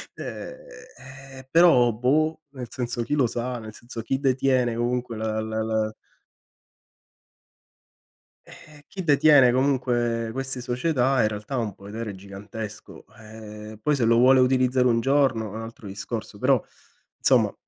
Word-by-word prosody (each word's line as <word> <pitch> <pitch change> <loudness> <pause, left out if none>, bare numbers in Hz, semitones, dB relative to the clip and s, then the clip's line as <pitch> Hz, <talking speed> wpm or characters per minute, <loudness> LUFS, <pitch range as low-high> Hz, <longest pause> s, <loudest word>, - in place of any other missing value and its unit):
ehm, - - -7 0.8
eh, 130 0 -12
però 165 -8 +6
boh, 155 +8 +1
nel 130 -3 -7
senso 120 -1 -3
chi 130 +6 -1
lo 135 -4 +3
sa, 120 +1 -4
nel 110 -1 -9
senso 120 0 -8
chi 135 +4 -2
detiene 130 -3 +1
comunque 120 -1 -2
la 110 0 -2
la 110 0 -3
la 110 -1 -1 2.5
Eh, 150 -1 -16
chi 190 -2 -6
detiene 145 -4 +6
comunque 120 -3 0
queste 130 0 -4
società 125 +1 +1
in - - +3
realtà 105 +4 -5
ha - - 0
un 110 -4 -2
potere 105 +1 -7
gigantesco. 100 +2 -9
Ehm, 110 0 -10
poi 150 +4 +1
se 125 -4 +1
lo 115 0 +4
vuole 130 +2 +6
utilizzare 130 0 +3
un 115 -1 +2
giorno 135 -4 +2
è - - -9
un 110 - -5
altro 115 -1 -10
discorso; 95 +1 -6
però, - - +2 0.6
insomma, - - +3
120 Hz, 145 wpm, -24 LUFS, 110-130 Hz, 2.5 s, però